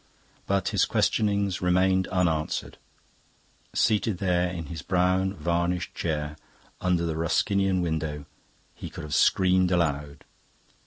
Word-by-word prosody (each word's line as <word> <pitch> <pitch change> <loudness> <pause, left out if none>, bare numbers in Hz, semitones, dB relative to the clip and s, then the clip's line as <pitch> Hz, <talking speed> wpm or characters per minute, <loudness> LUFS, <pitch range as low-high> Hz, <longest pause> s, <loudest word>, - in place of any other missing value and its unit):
But 100 -1 +1
his - - +2
questionings 100 -3 +1
remained 95 +1 +2
unanswered. 80 -4 -1 1.0
Seated 110 -2 +2
there 90 -1 +1
in 85 -2 -5
his 80 +1 -7
brown 95 +3 +1
varnished 85 +1 -1
chair 75 -2 -3 0.4
under 90 -2 +1
the 80 -1 -2
Ruskinian 95 +3 +1
window, 80 -3 -3 0.5
he - - -8
could - - -9
have 75 -1 -6
screamed 95 +2 +3
aloud. 75 -5 -1
90 Hz, 115 wpm, -26 LUFS, 80-95 Hz, 1.0 s, screamed